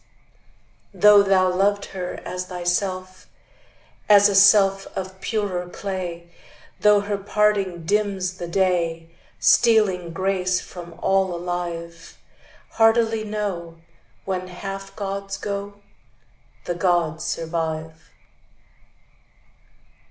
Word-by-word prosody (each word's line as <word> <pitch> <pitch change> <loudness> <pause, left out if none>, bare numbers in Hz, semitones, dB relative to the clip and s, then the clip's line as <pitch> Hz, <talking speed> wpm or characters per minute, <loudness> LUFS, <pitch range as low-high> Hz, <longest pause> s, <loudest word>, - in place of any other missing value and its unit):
Though 210 -1 +7
thou 190 -2 +3
loved 200 +2 +1
her 180 -2 -5
as 180 0 -5
thyself, 185 +1 -3 0.8
As 205 0 +7
a - - -1
self 195 0 +5
of 190 0 -6
purer 190 -5 -2
clay, 180 -3 -5 0.5
Though 210 -1 +5
her 200 0 -3
parting 200 -4 0
dims 195 -2 -1
the 175 - -5
day, 170 -3 0 0.3
Stealing 205 -7 +3
grace 185 0 0
from 175 -2 -10
all 190 -2 +2
alive; 170 -1 -6 0.5
Heartily 225 0 +3
know, 195 -6 -4 0.5
When 185 -1 -3
half 195 +1 -7
gods 195 -1 -4
go, 200 0 -6 0.8
The 175 - -2
gods 170 -3 0
survive. 160 -1 -4
190 Hz, 95 wpm, -22 LUFS, 175-200 Hz, 0.8 s, Though